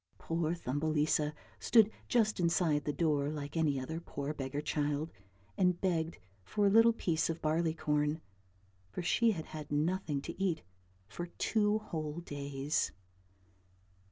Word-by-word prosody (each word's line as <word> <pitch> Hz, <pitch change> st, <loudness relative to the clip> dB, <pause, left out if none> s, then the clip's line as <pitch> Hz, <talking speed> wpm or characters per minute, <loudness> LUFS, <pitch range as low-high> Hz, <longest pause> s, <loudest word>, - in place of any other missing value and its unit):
Poor 165 Hz, 0 st, -1 dB
Thumbelisa 150 Hz, 0 st, +1 dB, 0.3 s
stood 220 Hz, -2 st, +5 dB, 0.2 s
just 220 Hz, -4 st, +2 dB
inside 170 Hz, -4 st, +2 dB
the 150 Hz, -, +1 dB
door 145 Hz, -3 st, +1 dB
like 145 Hz, -1 st, -5 dB
any 150 Hz, -4 st, +2 dB
other 160 Hz, +6 st, -4 dB
poor 145 Hz, -3 st, -4 dB
beggar 135 Hz, -1 st, -3 dB
child 150 Hz, +1 st, -1 dB, 0.5 s
and 180 Hz, -2 st, +3 dB
begged 165 Hz, -3 st, 0 dB, 0.3 s
for 205 Hz, -, 0 dB
a 200 Hz, -, +5 dB
little 225 Hz, +2 st, +7 dB
piece 170 Hz, -9 st, 0 dB
of 165 Hz, 0 st, -2 dB
barley 160 Hz, +1 st, +1 dB
corn, 150 Hz, 0 st, +1 dB, 0.7 s
for 175 Hz, -, -5 dB
she 225 Hz, +5 st, +3 dB
had 160 Hz, -4 st, -5 dB
had 150 Hz, -2 st, -8 dB
nothing 155 Hz, 0 st, 0 dB
to -, -, -6 dB
eat 180 Hz, -, 0 dB, 0.4 s
for 175 Hz, +10 st, -5 dB
two 210 Hz, +4 st, +1 dB
whole 160 Hz, -7 st, -4 dB
days. 140 Hz, -1 st, -2 dB
160 Hz, 140 wpm, -33 LUFS, 150-175 Hz, 0.7 s, little